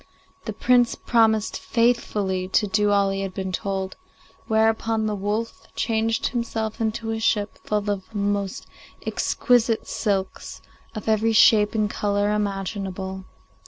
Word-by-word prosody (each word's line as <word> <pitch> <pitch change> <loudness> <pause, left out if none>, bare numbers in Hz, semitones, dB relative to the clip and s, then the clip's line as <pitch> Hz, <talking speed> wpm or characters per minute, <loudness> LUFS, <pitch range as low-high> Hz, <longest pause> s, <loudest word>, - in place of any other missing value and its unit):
The - - -3
Prince 245 -1 +3
promised 220 -2 +2
faithfully 210 -6 0
to 200 +3 +2
do 210 +1 +1
all 200 -1 +3
he 195 0 -2
had 195 -1 -5
been 190 -1 -3
told, 190 +1 -3 0.5
whereupon 220 0 +2
the 215 - -1
wolf 210 +3 -3
changed 225 0 0
himself 225 -2 -3
into 225 0 -1
a 225 - -2
ship 210 -2 0
full 210 -1 -1
of 205 +1 -3
most 200 -1 -1 0.4
exquisite 235 -3 +1
silks, 195 -2 -2 0.4
of 215 - -6
every 220 +1 +2
shade 215 0 +5
and 215 -1 +2
colour 205 0 0
imaginable. 195 -2 -3
210 Hz, 130 wpm, -24 LUFS, 195-225 Hz, 0.5 s, shade